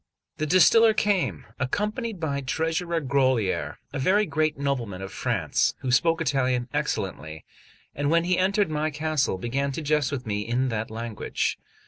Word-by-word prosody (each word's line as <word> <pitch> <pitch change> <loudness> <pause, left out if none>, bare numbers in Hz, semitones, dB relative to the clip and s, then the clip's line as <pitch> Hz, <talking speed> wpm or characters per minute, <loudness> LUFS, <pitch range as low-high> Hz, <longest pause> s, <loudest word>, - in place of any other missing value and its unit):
The 155 - -1
distiller 215 +7 +6
came, 205 -4 0
accompanied 210 - -2
by 140 -4 -2
Treasurer 165 +5 -1
Grolier, 130 - +1 0.2
a - - -3
very 200 +9 +3
great 155 -4 0
nobleman 125 -9 -2
of 95 - -7
France, - - 0
who 130 - -2
spoke 165 +6 +3
Italian 130 -5 +1
excellently, 90 - -3 0.5
and 145 0 -1
when 165 +1 +3
he 180 +1 +2
entered 195 -1 +2
my 155 +1 0
castle, 150 -6 0
began 135 +7 -1
to 160 - -4
jest 150 -2 +1
with 135 -3 -4
me 105 -1 -2
in 120 +4 0
that 110 -1 -3
language. 115 0 -3
140 Hz, 155 wpm, -25 LUFS, 125-165 Hz, 0.5 s, distiller